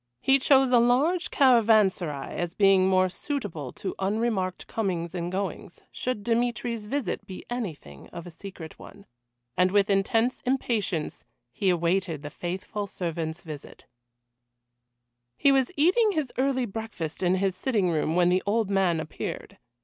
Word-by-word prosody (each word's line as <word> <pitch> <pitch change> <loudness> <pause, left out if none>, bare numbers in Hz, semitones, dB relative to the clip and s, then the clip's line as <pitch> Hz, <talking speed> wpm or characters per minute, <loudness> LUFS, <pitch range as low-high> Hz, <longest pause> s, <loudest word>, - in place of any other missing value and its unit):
He 270 - +4
chose 265 -1 +4
a 245 - +6
large 280 +10 +2
caravanserai 215 - +3
as 175 0 -3
being 195 -2 +5
more 185 0 +4
suitable 185 - -5
to 195 - -5
unremarked 195 -2 -1
comings 180 -6 -2
and 175 -1 -3
goings, 185 -2 -4
should 250 -5 -3
Dmitry's 235 -1 -1
visit 215 -6 -3
be 190 -2 -9
anything 155 - -6
of 170 - -9
a 175 - -9
secret 165 -2 -10
one. 200 - -13 0.5
And 180 +1 +3
with 200 +1 +2
intense 225 +5 +1
impatience 225 - -1 0.3
he 190 +9 0
awaited 170 -2 0
the 145 - -6
faithful 190 +5 -4
servant's 165 -3 -4
visit. 150 -3 -10 1.5
He 280 - +4
was 270 +1 +2
eating 395 +8 +4
his 305 -7 -2
early 260 -1 +1
breakfast 210 -8 -6
in 180 0 +3
his 190 -1 0
sitting 205 -5 0
room 160 0 0
when 175 0 +4
the 185 +1 +2
old 215 -1 +1
man 185 -4 +2
appeared. 160 -1 -6
195 Hz, 145 wpm, -26 LUFS, 175-240 Hz, 1.5 s, a